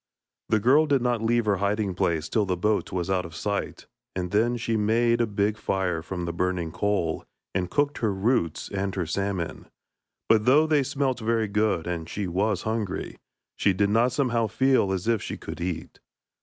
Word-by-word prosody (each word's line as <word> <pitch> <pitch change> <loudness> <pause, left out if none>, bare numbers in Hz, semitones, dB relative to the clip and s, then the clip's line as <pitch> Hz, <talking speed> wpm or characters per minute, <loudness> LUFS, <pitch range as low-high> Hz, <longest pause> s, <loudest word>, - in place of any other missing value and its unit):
The 110 - +3
girl 140 +8 +4
did 140 -4 +2
not 120 -2 +1
leave 115 0 +2
her 100 -2 +2
hiding 100 0 0
place 80 -3 0
till 105 +2 +1
the 90 -1 0
boat 105 +4 0
was 90 -3 -2
out 95 -1 +1
of 85 -2 -10
sight, 100 +3 -3 0.3
and 90 -1 -3
then 120 +4 +2
she 115 -1 -1
made 115 +2 +2
a 115 - +2
big 105 +1 0
fire 90 -5 -1
from 90 +1 -5
the 85 - -3
burning 90 -2 -1
coal, 100 -4 -1 0.3
and 90 -1 -1
cooked 145 +7 0
her 110 -3 +1
roots 95 - 0
and 100 -1 -3
her 90 -3 -1
salmon; 95 -1 -3 0.6
but 110 -1 +4
though 145 +5 +6
they 155 -2 +3
smelt 135 -2 -1
very 115 -1 0
good, 105 -4 +1
and 85 -2 -4
she 105 - -3
was 95 +2 0
hungry, 110 -3 -3 0.4
she 100 - +2
did 100 +2 +1
not 115 +4 +3
somehow 120 -4 +1
feel 130 -3 +2
as 95 +1 -2
if 115 -3 +2
she - - -5
could - - -8
eat. 90 -1 -4
105 Hz, 195 wpm, -26 LUFS, 90-115 Hz, 0.6 s, though